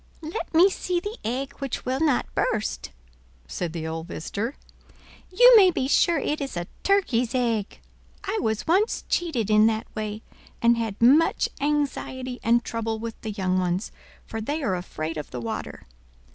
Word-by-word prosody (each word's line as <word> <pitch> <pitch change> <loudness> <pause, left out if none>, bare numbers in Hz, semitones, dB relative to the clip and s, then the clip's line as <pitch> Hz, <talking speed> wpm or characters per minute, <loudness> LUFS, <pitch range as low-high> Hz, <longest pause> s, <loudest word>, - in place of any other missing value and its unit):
"Let 320 +8 -5
me 335 +4 +6
see 365 -2 -1
the 415 +6 -6
egg 265 +4 -3
which 275 -3 -4
will 260 +1 -1
not 300 -5 +1
burst," 215 -1 -1 0.6
said 175 - -3
the 165 -1 -5
old 160 +1 -4
visitor. 210 - -4 0.8
"You - - +8
may 390 -4 +8
be 265 -7 -1
sure 335 +4 +3
it 295 +2 -1
is 270 -9 -4
a 175 - -2 0.2
turkey's 260 - +1
egg. 230 -5 -1 0.4
I 410 +2 -2
was 220 -1 -1
once 385 +7 +2
cheated 250 - 0
in 215 +1 +6
that 220 0 0
way, 215 0 -4 0.4
and 235 0 +4
had 225 -3 -3
much 290 +7 +4
anxiety 270 -3 -2
and 235 +1 +3
trouble 225 -1 -3
with 225 0 -7
the 220 - -5
young 185 -3 0
ones, 180 +3 -1 0.3
for 225 - -5
they 295 +7 -3
are 205 -8 +1
afraid 165 -2 -5
of 150 - -6
the 125 - -6
water. 115 -1 -5
235 Hz, 170 wpm, -25 LUFS, 210-300 Hz, 0.8 s, You